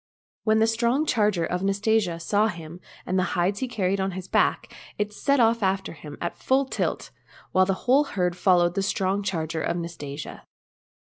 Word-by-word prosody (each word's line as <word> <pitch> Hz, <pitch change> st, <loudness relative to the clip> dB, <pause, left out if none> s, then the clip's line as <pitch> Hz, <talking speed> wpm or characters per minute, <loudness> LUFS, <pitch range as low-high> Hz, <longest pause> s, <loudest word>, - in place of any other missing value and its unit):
When 220 Hz, 0 st, +4 dB
the 220 Hz, -, +4 dB
strong 235 Hz, +6 st, +1 dB
charger 210 Hz, -, +1 dB
of 180 Hz, +2 st, -2 dB
Nastasia 195 Hz, -2 st, +1 dB
saw 205 Hz, +5 st, +2 dB
him 170 Hz, -3 st, -7 dB, 0.3 s
land 185 Hz, -, 0 dB
the 185 Hz, -1 st, -1 dB
hides 185 Hz, +3 st, +1 dB
he 260 Hz, -, -2 dB
carried 195 Hz, -4 st, -1 dB
on 190 Hz, 0 st, -1 dB
his 185 Hz, 0 st, -7 dB
back, -, -, +1 dB, 0.2 s
it 210 Hz, 0 st, -2 dB
set 280 Hz, +5 st, +1 dB
off 230 Hz, 0 st, +3 dB
after 195 Hz, -1 st, 0 dB
him 150 Hz, -2 st, -10 dB
at 170 Hz, -, -3 dB
full 270 Hz, +1 st, +2 dB
tilt, -, -, -3 dB, 0.4 s
and 185 Hz, 0 st, +4 dB
the 195 Hz, -, +2 dB
whole 275 Hz, +4 st, +4 dB
herd 180 Hz, -8 st, -1 dB
followed 175 Hz, -2 st, +3 dB
the 195 Hz, -, -1 dB
strong 195 Hz, 0 st, 0 dB
charger 165 Hz, -5 st, -2 dB
of 175 Hz, -, -1 dB
Nastasia. 155 Hz, -4 st, -7 dB
195 Hz, 180 wpm, -25 LUFS, 175-220 Hz, 0.4 s, When